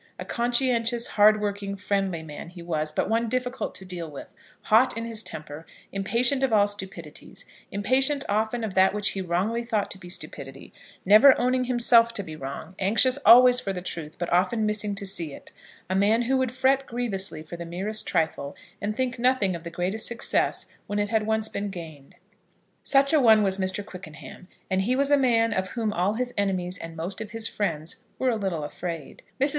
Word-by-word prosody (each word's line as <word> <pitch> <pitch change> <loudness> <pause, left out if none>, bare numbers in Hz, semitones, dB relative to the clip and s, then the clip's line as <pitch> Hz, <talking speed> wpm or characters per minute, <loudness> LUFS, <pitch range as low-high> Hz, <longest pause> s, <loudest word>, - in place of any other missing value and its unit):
A - - -7
conscientious, 240 -1 +1
hard 215 +1 +5
working, 200 -1 -3
friendly 195 -4 -1
man 155 +1 -9
he 175 -1 -11
was, 155 -2 -2
but - - -1
one 225 +2 0
difficult 250 +1 -3
to 190 - -5
deal 175 -3 -5
with; 150 +6 -10 0.3
hot 230 +3 +3
in 230 - -3
his 230 -1 -3
temper, 150 -5 -7 0.3
impatient 235 +7 +1
of 265 - +2
all 205 -2 +5
stupidities, 190 -6 -6 0.3
impatient 265 +7 +2
often 220 +3 -1
of 215 -3 -3
that 190 +1 +4
which 205 -1 +2
he 195 - -3
wrongly 190 +7 -1
thought 220 -4 -2
to 190 - -7
be 175 - -11
stupidity, 135 -6 -6 0.3
never 215 +8 +7
owning 255 +1 +1
himself 235 -2 +4
to 200 - -3
be 155 -3 -8
wrong, 140 +4 -7
anxious 235 +7 +3
always 250 +1 +8
for 200 -6 -3
the 180 - -5
truth, 160 -4 -6
but 175 0 -3
often 215 +5 +2
missing 210 -1 0
to 200 0 -5
see 170 -6 -1
it, - - -14 0.4
a 185 - -2
man 210 +4 +3
who 260 +3 +1
would 260 -2 0
fret 265 +1 +1
grievously 200 -9 -3
for 165 +2 -9
the 170 - -6
merest 190 +6 -4
trifle, 155 -3 -1 0.3
and 210 +1 -3
think 255 -1 -2
nothing 245 -7 +2
of 165 - -8
the 170 - -6
greatest 180 +6 -1
success 235 -1 0 0.2
when 205 - -3
it 205 0 0
had 220 -1 0
once 220 0 +1
been 205 -1 -4
gained. 160 -7 -10 0.7
Such 275 +2 +3
a 310 - +5
one 220 -3 +6
was 195 -1 +1
Mr. 190 +2 -1
Quickenham; 180 -2 -11 0.2
and 190 0 0
he 240 +6 +1
was 280 +2 +1
a - - +7
man 230 -5 +2
of 190 -1 -1
whom 220 0 -2
all 190 +4 0
his 245 +1 -3
enemies 185 -2 -1
and 165 0 -8
most 180 +6 -4
of 220 - -6
his 225 0 -1
friends 165 -6 -3 0.2
were 260 -1 +1
a - - 0
little 190 -7 -2
afraid. 165 0 -6 0.2
Mrs. 275 +2 +3
205 Hz, 200 wpm, -25 LUFS, 180-235 Hz, 0.7 s, always